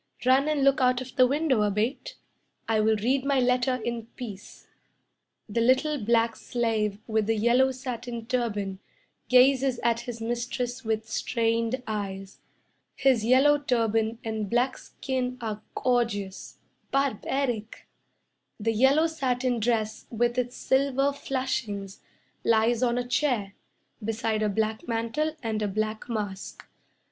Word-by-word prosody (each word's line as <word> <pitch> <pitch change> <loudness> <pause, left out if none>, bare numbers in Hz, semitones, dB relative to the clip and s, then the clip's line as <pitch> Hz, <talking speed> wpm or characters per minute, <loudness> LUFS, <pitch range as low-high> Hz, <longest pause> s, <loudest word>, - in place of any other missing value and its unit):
Run 265 +3 +4
and 300 -2 +1
look 275 0 +4
out 250 -1 +3
of 255 0 -8
the 255 -2 +6
window, 280 -4 +1
Abate. 210 +6 -1 0.5
I 225 -1 +2
will 220 +1 +3
read 255 +6 +1
my 275 -1 +2
letter 250 +1 +2
in 235 -1 -4
peace." 210 -6 -9 0.8
The 230 +2 -1
little 260 +2 +2
black 230 +1 +2
slave 220 -4 -1
with 220 -2 0
the 225 - +2
yellow 240 +4 +3
satin 245 -3 -6
turban 210 -6 -2 0.5
Gazes 260 0 +4
at 230 0 +2
his 240 -1 -6
mistress 240 +2 -3
with 220 0 -2
strained 230 +2 0
eyes. 195 -3 -5 0.6
His 265 -5 +3
yellow 270 +5 +5
turban 225 -4 0
and 220 -2 -3
black 245 +4 +1
skin 255 -1 -3
Are 215 -3 -4
gorgeous 225 -6 -1 0.3
barbaric. 265 -3 -1 0.7
The 225 +2 0
yellow 265 +8 +4
satin 255 -6 0
dress 220 -1 -1
with 240 +1 0
its 245 0 -3
silver 275 +1 +2
flashings 235 -8 -3 0.4
Lies 230 +1 +3
on 240 -1 +2
a 245 0 -2
chair 245 -7 0 0.5
Beside 220 0 -1
a 215 - +2
black 220 +2 -1
mantle 235 +7 -1
and 220 -2 -2
a 210 - +1
black 215 +3 -3
mask. 205 -4 -5
235 Hz, 135 wpm, -27 LUFS, 220-255 Hz, 0.8 s, the